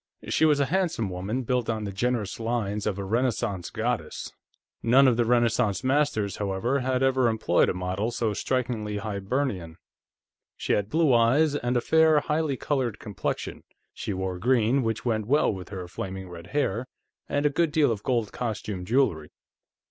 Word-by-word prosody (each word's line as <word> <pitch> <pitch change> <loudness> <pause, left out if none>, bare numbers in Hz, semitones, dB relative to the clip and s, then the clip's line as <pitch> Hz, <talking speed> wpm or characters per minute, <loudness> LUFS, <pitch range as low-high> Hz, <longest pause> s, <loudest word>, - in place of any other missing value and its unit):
She 160 - +3
was 150 -2 +4
a 140 - +3
handsome 170 - 0
woman, 100 +8 -3
built 125 -1 -1
on 110 -1 -1
the 100 - -4
generous 110 +1 -1
lines 110 -3 -2
of 100 -2 -1
a 100 - -3
Renaissance 110 -3 -1
goddess; - - -3 0.5
none 130 +4 +5
of 125 - +4
the 120 0 +2
Renaissance 120 -3 +2
masters, 130 -7 +1
however, 105 +7 0
had 130 0 0
ever 130 -2 +3
employed 110 -6 +2
a - - -1
model 90 +4 -2
so 115 -2 -1
strikingly 110 -2 -2
Hibernian. 100 - -3 0.8
She - - -1
had 100 0 0
blue 155 -2 +3
eyes, 130 +7 +4
and 125 -3 0
a - - +1
fair, 160 +2 +4
highly 150 -3 -1
colored 130 -7 -1
complexion; 105 -4 -4 0.3
she - - -5
wore 95 -1 -3
green, 125 +4 +3
which 115 -1 -2
went 110 -3 0
well 145 -3 +3
with 95 -2 -8
her 95 -3 -6
flaming 95 0 -6
red 85 0 -10
hair, 130 -4 -1 0.4
and 145 +1 0
a 145 - +4
good 165 +2 +1
deal 150 -4 +3
of 105 -3 -3
gold 115 -4 0
costume 105 -5 -4
jewelry. 90 - +1
115 Hz, 170 wpm, -26 LUFS, 100-130 Hz, 0.8 s, none